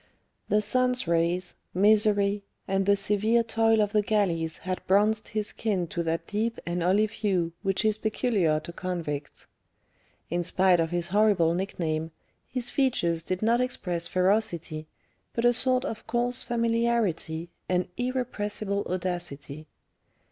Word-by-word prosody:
The 210 - +3
sun's 250 +1 +1
rays, 170 +2 +1 0.2
misery, 205 0 +3 0.3
and 195 0 0
the 200 - +6
severe 210 +3 +2
toil 225 -1 +3
of 205 - -2
the 210 -1 +3
galleys 175 -7 0
had 185 0 -2
bronzed 210 +3 +3
his 215 -1 -2
skin 200 -6 -1
to 170 - -2
that 165 0 -2
deep 225 +2 -1
and 175 +1 -2
olive 205 +4 +3
hue 185 -6 -1
which 195 +1 0
is 215 0 +2
peculiar 210 -8 +1
to 170 +2 -9
convicts. 165 -6 -4 0.9
In 175 +1 +1
spite 180 +1 +3
of 165 0 +1
his 175 +1 -2
horrible 200 -4 +3
nickname, 165 -4 -2 0.4
his 250 -1 -4
features 175 - +1
did 185 +4 -3
not 235 +2 +3
express 180 -9 -2
ferocity, 180 -5 0 0.5
but 235 - 0
a 240 - +6
sort 255 +2 +1
of 225 -6 -6
coarse 245 +1 +1
familiarity 230 -8 0 0.2
and 180 0 +1
irrepressible 215 -5 -2
audacity. 165 -5 -4
200 Hz, 140 wpm, -27 LUFS, 175-220 Hz, 0.9 s, the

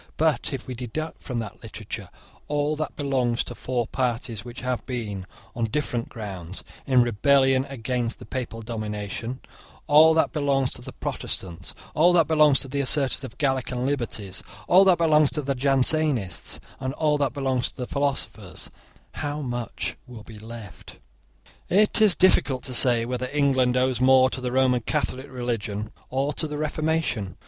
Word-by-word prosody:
But 160 -1 +1
if 135 -2 -5
we 130 - -5
deduct 125 +7 -5
from 125 - -5
that 110 -4 -5
literature - - -7 0.4
all 145 +1 0
that 155 +1 -4
belongs 130 -5 0
to - - -7
four 125 -2 -2
parties 120 -4 -2
which 120 0 -9
have 125 -1 -2
been, 105 -7 -4 0.3
on 115 - 0
different 120 -1 -2
grounds, 95 -5 -7 0.2
in 130 -3 +5
rebellion 135 +3 +3
against 125 -2 -3
the - - -11
Papal 115 -3 -5
domination, 110 +2 -5 0.4
all 160 +2 +7
that 160 - +3
belongs 140 -3 +1
to - - -3
the - - -8
Protestants, 85 -3 -4 0.2
all 175 +3 +5
that 165 -4 +4
belongs 150 -3 +5
to - - -2
the 140 +2 -1
assertors 135 -1 +2
of - - -5
the 120 - -23
Gallican 130 -3 0
liberties, 115 -9 -2 0.3
all 185 +2 +7
that 185 -2 +5
belongs 155 -3 +4
to 150 - -2
the 140 +1 0
Jansenists, 135 - +1 0.2
and 130 +1 -3
all 150 -2 +1
that 140 -4 0
belongs 130 -3 0
to - - -14
the 125 - -3
philosophers, 140 +1 -3 0.4
how 145 +1 -4
much 120 -8 -4
will 120 -4 -10
be 110 -1 -12
left? 110 -2 -10 0.7
It 210 +3 +3
is 210 -4 +6
difficult 140 -8 +3
to 130 - -4
say 120 -2 +5
whether 125 +1 -3
England 130 -3 +2
owes 125 -1 +1
more 130 0 +6
to 130 - -4
the 125 -1 -2
Roman 130 -1 +3
Catholic 130 +3 -2
religion 115 -4 -3 0.2
or 135 +3 0
to 155 - -1
the 150 0 -5
Reformation. 155 - -1
130 Hz, 170 wpm, -25 LUFS, 120-145 Hz, 0.7 s, all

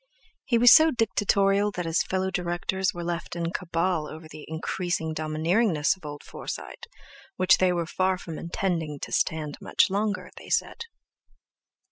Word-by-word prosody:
He 240 - +2
was 240 +1 +8
so 320 0 +7
dictatorial 205 - +2
that 180 -2 -3
his 165 +1 +1
fellow 190 0 -1
directors 180 +1 -1
were 175 - -6
left 170 -1 -4
in 170 -1 -2
cabal 170 -2 -1
over 160 +1 -10
the 155 -1 -11
increasing 160 0 -2
domineeringness 155 +3 +1
of 180 -5 -11
old 145 0 -8
Forsyte, 475 - -7 0.5
which 185 +1 +4
they 185 -1 +3
were 170 -1 -1
far 185 +3 0
from 165 -3 -7
intending 170 -3 -2
to - - -7
stand 155 -2 -1
much - - +2
longer, 205 +1 -2
they - - -12
said. 465 - -1
175 Hz, 155 wpm, -26 LUFS, 160-190 Hz, 0.5 s, was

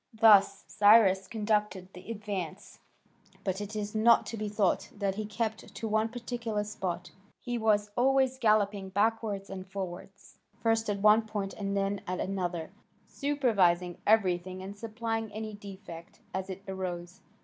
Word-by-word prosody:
Thus 210 -3 +6
Cyrus 205 -3 +5
conducted 210 -3 -1
the 180 +4 -12
advance, 205 -6 -5 0.6
but 190 -1 -2
it 205 +1 -6
is 210 -1 -3
not 225 +2 +5
to 230 - -5
be 215 -1 -3
thought 205 -3 +1
that 200 -2 -1
he 210 +1 -4
kept 220 0 -4
to 225 - -4
one 215 +1 +1
particular 235 -3 -3
spot; 180 -4 -4 0.3
he 245 -1 -3
was 210 -2 +2
always 260 0 +3
galloping 205 -4 +2
backwards 205 0 0
and 190 -1 -7
forwards, 195 0 -7 0.2
first 225 -1 +1
at 200 -1 -1
one 215 +1 +6
point 205 -3 -3
and 200 -1 -3
then 195 0 -1
at 185 0 -2
another, 175 -4 -3 0.4
supervising 200 - +1
everything 185 -3 +2
and 195 +1 -7
supplying 225 0 -3
any 215 0 -5
defect 195 -4 -10
as 190 0 -3
it 190 +1 -7
arose. 180 -2 -5
205 Hz, 150 wpm, -30 LUFS, 190-220 Hz, 0.6 s, Thus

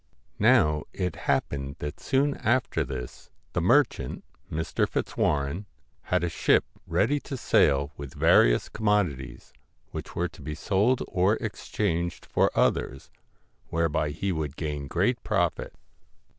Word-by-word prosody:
Now 75 0 +4
it 90 -3 -2
happened 70 0 0
that 75 +1 -6
soon 140 +1 +1
after 125 +3 +1
this, 65 -2 -7 0.2
the 85 - 0
merchant, 125 - +2 0.3
Mr. 80 +1 -1
Fitzwarren, 75 +7 -1 0.4
had 90 -1 +1
a - - +1
ship 80 - +2 0.2
ready 140 +8 +2
to 135 - -6
sail 70 - +3
with 70 -3 -8
various - - +4
commodities, 85 - -1 0.4
which - - -7
were - - 0
to - - -15
be 75 +2 -5
sold 105 - +1
or 95 +4 +2
exchanged 85 -6 -2
for - - +2
others, 65 - 0 0.6
whereby 80 -2 0
he 95 +6 -2
would 80 -4 -3
gain 75 -3 -4
great - - +1
profit. - - -1
80 Hz, 130 wpm, -27 LUFS, 70-105 Hz, 0.6 s, Now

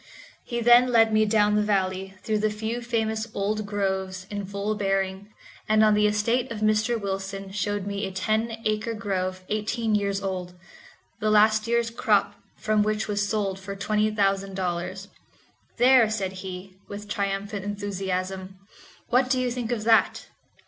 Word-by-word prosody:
He 235 -1 -3
then 240 +2 +7
led 225 -2 +4
my 215 0 +4
down 210 -1 +3
the 210 - +3
valley, 190 -2 -1
through 215 -1 0
the 215 +1 +1
few 220 +3 -4
famous 220 -2 -1
old 210 +1 -1
groves 190 -2 -2
in 205 -2 -4
full 200 +2 -2
bearing, 195 -1 -1 0.4
and 215 0 +5
on 215 -1 +5
the 210 0 +4
estate 230 +5 +1
of 215 -2 -5
Mr. 215 +2 +2
Wilson 195 -1 -4
showed 205 0 -2
me 200 0 -3
a - - -6
ten 220 +4 -1
acre 215 +2 -1
grove 185 -3 -3
eighteen 215 +1 -1
years 200 -1 +1
old, 180 -2 -4 0.6
the 215 - 0
last 215 +1 +4
year's 235 0 +1
crop 210 -3 +2 0.2
from 215 -1 +1
which 215 +1 0
was 205 -1 -1
sold 200 -3 -1
for 200 +1 -7
twenty 210 +2 +1
thousand 195 -2 0
dollars. 185 +1 -3 0.7
"There," 245 -2 +6
said 200 -4 -2
he, 185 0 -8
with 205 +1 -8
triumphant 200 0 -2
enthusiasm, 190 -2 -4 0.5
"what 255 +1 +3
do 260 -1 +2
you 250 -1 0
think 240 -1 -3
of 225 -3 -1
that? 225 0 +3
210 Hz, 165 wpm, -25 LUFS, 195-220 Hz, 0.7 s, then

